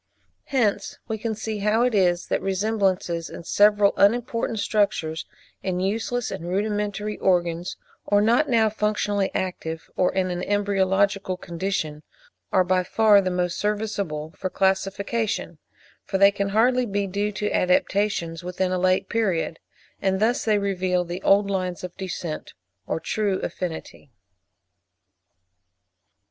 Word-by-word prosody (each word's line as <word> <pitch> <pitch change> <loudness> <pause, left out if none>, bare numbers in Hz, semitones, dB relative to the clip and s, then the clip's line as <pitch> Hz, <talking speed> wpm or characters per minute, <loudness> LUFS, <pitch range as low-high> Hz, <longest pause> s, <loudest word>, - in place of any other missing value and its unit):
Hence 215 -7 0
we 220 -2 -3
can 220 0 -2
see 220 0 -4
how 210 +3 +2
it 250 -1 +2
is 180 -3 +2
that - - -1
resemblances 190 -4 0
in - - -9
several 205 +2 +4
unimportant 230 +2 +2
structures, 200 -7 0 0.3
in 180 -2 -2
useless 225 +5 -1
and 170 - -5
rudimentary 210 +1 -2
organs, 175 -1 0 0.3
or 205 - +4
not 235 +8 +3
now 225 -3 +4
functionally 210 -2 0
active, 165 -3 -4
or 180 - +2
in 185 -1 0
an 175 0 -3
embryological 195 -1 +1
condition, 170 -4 -3 0.5
are 185 - +4
by 185 0 +1
far 210 +1 +5
the 185 - -1
most 180 0 -1
serviceable 200 -7 -2
for 185 - -3
classification; 195 +4 -1 0.4
for 195 - -2
they 200 +1 +7
can 200 0 -2
hardly 245 +4 +3
be 200 -1 -1
due 200 +2 -1
to 210 +1 -2
adaptations 180 -2 +1
within 180 +1 -1
a 185 - 0
late 185 +1 +2
period; 190 -8 -1 0.4
and 190 -1 +1
thus 235 +5 +2
they 215 -2 +3
reveal 185 -3 0
the 175 +2 -5
old 200 +1 +4
lines 185 -3 -2
of 180 -1 -6
descent 180 -4 -5 0.3
or - - -1
of - - -9
true 205 -3 0
affinity. 165 -5 -6
195 Hz, 140 wpm, -24 LUFS, 180-210 Hz, 0.5 s, they